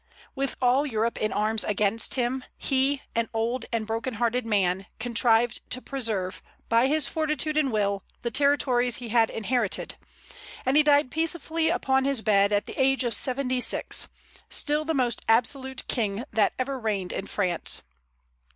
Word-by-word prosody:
With 275 0 -2
all 255 +3 +4
Europe 230 -4 -1
in 215 - 0
arms 215 +1 +1
against 210 +2 +1
him, 255 0 -1
he, 270 +1 0
an 230 0 0
old 230 +2 -1
and 230 -2 -1
broken 225 +3 -3
hearted 240 +1 0
man, 195 -2 +1
contrived 230 0 +2
to 255 - -3
preserve, 220 -9 -2 0.3
by 230 +3 +4
his 300 0 +2
fortitude 305 -1 -1
and 295 -4 +2
will, 200 -2 0 0.2
the 235 - -2
territories 250 -3 +2
he 240 -2 -6
had 225 0 +3
inherited; 225 -1 -2 0.7
and 260 +2 +2
he 305 - +7
died 290 -3 +3
peacefully 320 0 -1
upon 265 -6 +1
his 275 -5 0
bed, 200 -1 +4
at 205 0 +1
the - - -4
age 270 0 +3
of 240 -2 0
seventy 255 +2 0
six, - - 0 0.4
still 300 +1 +1
the 320 0 -1
most 245 -4 0
absolute 260 +3 +1
king 215 -1 -1
that 215 - +2
ever 265 +1 -2
reigned 205 -6 -2
in 195 - -4
France. 180 -5 0
245 Hz, 160 wpm, -26 LUFS, 220-270 Hz, 0.7 s, he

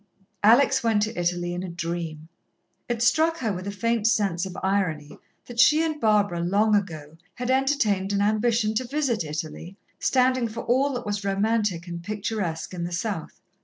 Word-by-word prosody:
Alex 235 +6 +5
went 220 -3 +2
to 220 +2 -3
Italy 175 0 -1
in 175 - -4
a 185 - -5
dream. 170 -2 -5 0.6
It 235 -1 0
struck 320 +6 +3
her 225 -9 -1
with 185 +1 -6
a - - -2
faint 225 +2 0
sense 195 -5 +1
of 185 - -9
irony 180 -7 -1 0.3
that 240 -1 -8
she 300 +5 +6
and 310 -2 -2
Barbara, 205 -5 +2
long 200 +5 +2
ago, 160 -6 -2 0.2
had 250 +1 -2
entertained 260 -8 +1
an 200 - +1
ambition 215 +1 +1
to 245 +3 -2
visit 270 - 0
Italy, 155 +4 -6 0.2
standing 255 -1 +2
for 230 +1 -6
all 265 +4 +2
that 245 -1 -4
was 205 -1 -3
romantic 200 -3 0
and 170 -1 -6
picturesque 200 -4 -3
in 175 -2 -4
the 175 - -4
South. 175 -1 -4
205 Hz, 175 wpm, -25 LUFS, 175-235 Hz, 0.6 s, she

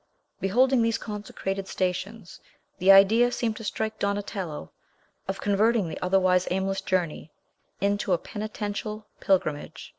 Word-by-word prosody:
Beholding 250 +6 +3
these 230 0 +1
consecrated 195 -2 -5
stations, 185 +2 -3 0.4
the 190 +2 +6
idea 220 +5 +6
seemed 230 -3 -1
to - - -8
strike 220 +1 -3
Donatello 200 - -3 0.6
of 195 0 -3
converting 205 -1 +2
the - - -6
otherwise 185 0 +2
aimless 190 +1 -1
journey 175 -5 -2 0.5
into 200 0 0
a 175 - +4
penitential 210 +1 -5
pilgrimage. 155 -6 -1
200 Hz, 120 wpm, -26 LUFS, 185-215 Hz, 0.6 s, the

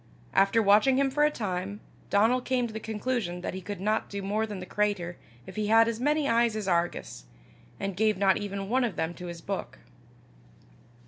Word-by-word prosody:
After 195 +4 +4
watching 210 +6 +5
him 275 -1 +2
for 295 +2 +2
a - - +4
time, 200 -5 -4 0.3
Donal 225 +5 +3
came 250 -1 0
to 225 - -6
the 220 - -4
conclusion 215 -5 -3
that - - -4
he 190 - -5
could 200 +1 -6
not 215 +3 0
do 200 -1 -5
more 215 +3 0
than 210 -2 -6
the 185 - -6
cratur 200 -4 -1 0.3
if - - -11
he 210 -1 0
had 225 +1 +6
as 230 -1 -2
many 295 +2 +1
eyes 230 -2 +3
as 215 -3 -3
Argus, 170 - -1 0.5
and 195 -1 -3
gave 215 +1 +2
not 195 -1 +3
even 200 -1 -4
one 255 +4 +2
of 230 -6 -1
them 160 +1 -2
to 180 0 -8
his 170 -1 -7
book. 195 +2 -5
210 Hz, 205 wpm, -28 LUFS, 190-230 Hz, 0.5 s, had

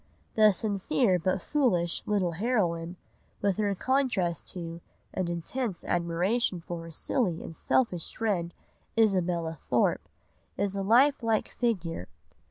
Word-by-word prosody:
The 215 -1 +6
sincere 200 0 +1
but 185 +2 0
foolish 185 - +1
little 195 -4 +1
heroine, 175 -4 0 0.4
with 200 -2 +1
her 205 -2 +1
contrast 230 - 0
to 170 -2 -6 0.3
and 185 -2 -1
intense 180 +4 -3
admiration 175 +4 0
for 170 0 -6
her 165 - -9
silly 180 - -1
and 165 - -8
selfish 180 -8 0
friend, 190 -7 0 0.5
Isabella 180 -6 +2
Thorpe, 155 - 0 0.5
is 200 0 0
a 195 - -1
life 255 +8 +4
like 225 -2 +1
figure. 180 - -2
190 Hz, 125 wpm, -29 LUFS, 170-225 Hz, 0.5 s, The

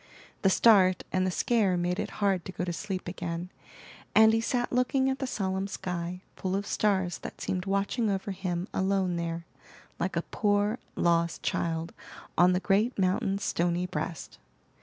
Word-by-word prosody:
The 195 - +4
start 190 -3 +5
and 185 0 +1
the - - +1
scare 195 -1 +2
made 175 +1 -1
it - - -2 0.2
hard 190 -3 +2
to - - -5
go 180 - -4
to 175 -1 -2
sleep 190 +1 -4
again, 175 0 -4 0.6
and 220 0 +7
he 225 - +2
sat 245 +1 -1
looking 260 +2 +2
at 265 - -3
the 265 - -2
solemn 190 -4 -2
sky, 180 -2 -4
full 190 0 -2
of 200 +1 -2
stars 190 -5 0
that - - -8
seemed 185 +1 -3
watching 200 +4 0
over 195 0 -2
him 185 -1 -3
alone 190 -2 +1
there, 170 0 -3 0.5
like 175 +1 -1
a 170 - 0
poor, 205 +2 +1 0.2
lost 170 -1 +1
child 165 0 -1 0.4
on 180 +1 +5
the 180 - +2
great 210 +6 +1
mountain's 195 +1 +1
stony 175 0 0
breast. 155 - -5
190 Hz, 170 wpm, -29 LUFS, 175-205 Hz, 0.6 s, and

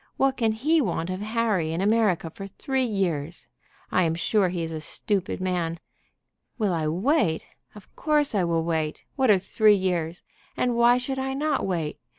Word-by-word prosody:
"What 270 0 +2
can 225 -3 +1
he 305 +9 +2
want 175 - -2
of 185 +1 -4
Harry 215 -7 0
in 165 - -2
America 200 -5 +2
for 195 +3 -8
three 260 +6 -1
years? 175 -7 -2 0.4
I 185 - +3
am 165 -2 +1
sure 190 +2 +1
he 175 -1 -3
is 165 - -4
a 160 -1 -5
stupid 190 +5 -2
man. 175 -3 -2 0.8
Will 210 -6 +1
I 160 -2 -1
wait? 185 - +1 0.3
Of 210 - -15
course 300 -3 +1
I 200 -3 +2
will 165 -1 +1
wait. 160 -2 -2
What 265 -3 +2
are 205 - +7
three 210 +3 +3
years? 175 -3 -2 0.3
And 245 -1 +1
why 235 +1 +5
should 265 +1 -3
I 265 0 -2
not 290 -5 0
wait? 165 -5 -2
195 Hz, 180 wpm, -25 LUFS, 170-235 Hz, 0.8 s, are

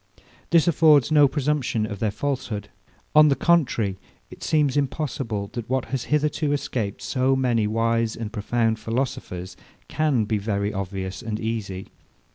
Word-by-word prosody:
This 170 0 +4
affords 155 -3 +5
no 150 -2 +6
presumption 135 -5 0
of 105 -2 -6
their 110 - +1
falsehood. 110 -3 -3 0.4
On 155 0 +8
the 140 - +3
contrary, 125 - +1 0.3
it - - -12
seems 150 -3 +1
impossible, 125 -7 -2
that 120 -2 -6
what 130 -1 0
has 130 -2 -1
hitherto 150 0 +1
escaped 125 -8 -3
so 130 0 +1
many 120 -5 +1
wise 115 +1 0
and 110 -2 -6
profound 115 +1 0
philosophers 105 -6 -3 0.3
can 145 -8 +1
be 105 0 0
very 100 0 -1
obvious 95 0 -4
and 110 -2 -4
easy. 105 -4 -4
115 Hz, 145 wpm, -24 LUFS, 105-145 Hz, 0.4 s, On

